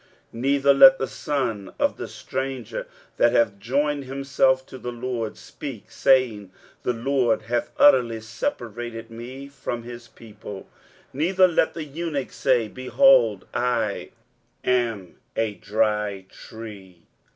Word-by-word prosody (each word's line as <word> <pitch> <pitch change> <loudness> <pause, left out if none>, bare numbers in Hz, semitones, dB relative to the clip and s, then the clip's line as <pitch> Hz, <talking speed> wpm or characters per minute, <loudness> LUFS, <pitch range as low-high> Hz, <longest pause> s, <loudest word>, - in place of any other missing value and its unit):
23:056:003 115 - -7
Neither 140 +1 +4
let 135 -1 +9
the 135 - -2
son 120 -5 -3
of - - +1
the - - -5
stranger, 130 -4 -5 0.3
that 120 0 +4
hath 110 -4 +2
joined 140 +5 0
himself 135 0 +1
to 130 - -11
the 125 - -5
LORD, 120 -2 -4
speak, 135 -8 -9
saying, 120 -8 +2 0.3
The - - 0
LORD 120 -1 +1
hath 120 +2 -1
utterly 120 -11 +5
separated 115 +1 -5
me 125 +4 -8
from 125 -4 -5
his 120 0 -9
people: 105 -3 -11 0.5
neither 185 +7 +4
let 165 -2 +1
the 165 - -4
eunuch 150 -2 -4
say, 115 -2 +1
Behold, 130 - +4
I 120 -4 -1 0.5
am 115 -7 -1 0.2
a 110 -2 0
dry 105 -1 -1
tree. 100 -6 -11
120 Hz, 130 wpm, -24 LUFS, 110-135 Hz, 0.5 s, let